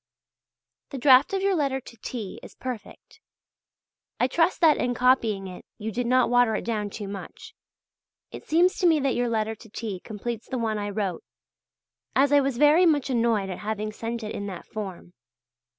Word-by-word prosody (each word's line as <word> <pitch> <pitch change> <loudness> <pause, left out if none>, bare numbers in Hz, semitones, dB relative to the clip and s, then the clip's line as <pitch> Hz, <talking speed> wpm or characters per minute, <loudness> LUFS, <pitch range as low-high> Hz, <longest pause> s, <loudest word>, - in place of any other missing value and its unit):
The 275 - -6
draft 260 +1 +6
of 390 0 -1
your 395 0 +3
letter 280 -6 0
to 235 -2 -14
T. 220 -3 -6
is - - -13
perfect. 250 -5 -8 1.0
I - - +4
trust 330 +6 +1
that 315 -3 +6
in 245 0 -1
copying 230 -6 +2
it 180 -1 -9
you 220 0 -4
did 240 +2 -2
not 255 +1 +4
water 245 -2 +3
it - - -3
down 215 -3 -2
too 205 0 -7
much. 195 0 -9 0.8
It - - -9
seems 350 +4 +2
to 360 - +4
me 320 -2 +4
that 270 -2 +1
your 245 0 0
letter 220 -1 0
to 225 +1 -15
T. 205 -3 -5
completes 220 +3 -6
the 260 - -2
one 220 -3 -1
I 205 0 -3
wrote; 200 -4 -3 0.9
as 275 +1 +4
I 285 - +6
was 270 -3 -1
very 300 +6 +6
much 290 -4 +1
annoyed 230 -5 +1
at 180 - -6
having 215 0 -3
sent 230 +2 -5
it 215 - -5
in 200 - -4
that 190 -3 -7
form. 190 -5 -7
235 Hz, 190 wpm, -26 LUFS, 210-270 Hz, 1.0 s, draft